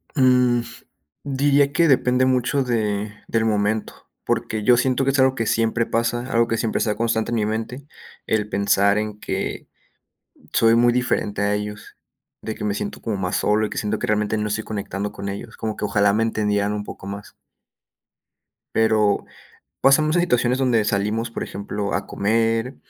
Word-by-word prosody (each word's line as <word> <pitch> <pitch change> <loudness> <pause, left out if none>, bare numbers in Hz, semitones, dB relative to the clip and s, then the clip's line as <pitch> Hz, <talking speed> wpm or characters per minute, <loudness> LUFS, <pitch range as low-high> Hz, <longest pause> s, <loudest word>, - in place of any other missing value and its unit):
Mm, 125 -3 +4 0.6
diría 140 0 +2
que 165 +3 +3
depende 130 -1 +3
mucho 130 +2 +1
de 105 -3 -1 0.2
del 115 -1 +1
momento. 105 0 0 0.3
Porque 110 -1 -1
yo 125 0 +5
siento 130 +1 +1
que 135 - +2
es 140 - 0
algo 130 0 +4
que 115 - -1
siempre 115 +1 +1
pasa, 120 +3 -1
algo 115 0 +3
que 115 - 0
siempre 110 0 -1
se 110 - 0
da 105 - 0
constante 115 -1 0
en 120 - -1
mi 110 - +1
mente, 115 +6 -4 0.4
el 105 -1 0
pensar 100 0 +2
en 105 0 -3
que - - -4 0.8
soy 115 0 +4
muy 120 0 +4
diferente 120 -4 -1
a 100 0 +1
ellos, 105 0 -6 0.5
de 110 - -5
que - - -6
me 105 -1 0
siento 205 - -5
como 110 -3 -3
más 90 0 -2
solo 105 +4 +2
y - - -8
que - - -5
siento 105 0 -2
que - - -3
realmente 105 0 +1
no 105 - -1
estoy 110 +1 -2
conectando 100 -1 -4
con 100 - -6
ellos, 100 +1 -7
como 110 -1 -4
que - - -4
ojalá 100 -1 +2
me 110 +2 +1
entendieran 105 -2 0
un 105 0 -3
poco 100 - -10
más. 100 +1 -7 1.4
Pero, 110 -2 +2 0.6
pasamos 155 +4 +4
a - - +4
situaciones 125 -7 +2
donde 120 -4 +2
salimos, 105 +3 -1
por - - -4
ejemplo, 100 0 -4
a - - -1
comer 115 +4 0
110 Hz, 185 wpm, -22 LUFS, 105-125 Hz, 1.4 s, yo